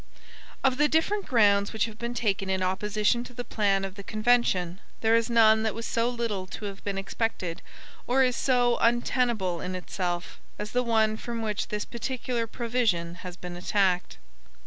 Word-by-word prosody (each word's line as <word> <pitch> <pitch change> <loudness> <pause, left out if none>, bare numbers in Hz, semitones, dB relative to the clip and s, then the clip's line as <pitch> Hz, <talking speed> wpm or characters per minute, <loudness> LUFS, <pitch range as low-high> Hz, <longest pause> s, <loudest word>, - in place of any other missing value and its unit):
Of 260 -1 +3
the 300 +1 +4
different 380 +7 +1
grounds 205 -6 +4
which 220 -2 +1
have 220 -1 -9
been 235 +1 -4
taken 200 -4 0
in 190 -1 0
opposition 210 +5 +1
to 250 - -12
the 245 - -4
plan 200 -4 +1
of 190 - -6
the 200 - -9
convention, 215 -5 +1 0.2
there 225 0 +4
is 230 +1 +2
none 220 -2 +5
that 220 -1 -1
was 230 0 -5
so 230 +1 +1
little 230 -6 -3
to 210 +3 -7
have 200 -1 -7
been 200 -1 -3
expected, 195 -3 -2 0.5
or 265 +2 +4
is 250 -1 +2
so 245 -2 +2
untenable 235 -6 +1
in 185 0 -4
itself, 180 -1 -4 0.2
as 210 0 -5
the 250 - +2
one 220 -2 +2
from 230 0 -4
which 210 -2 -2
this 210 0 -3
particular 240 -1 -3
provision 225 -8 0
has 180 -1 -8
been 180 -1 -7
attacked. 180 - 0
220 Hz, 180 wpm, -27 LUFS, 195-240 Hz, 0.5 s, none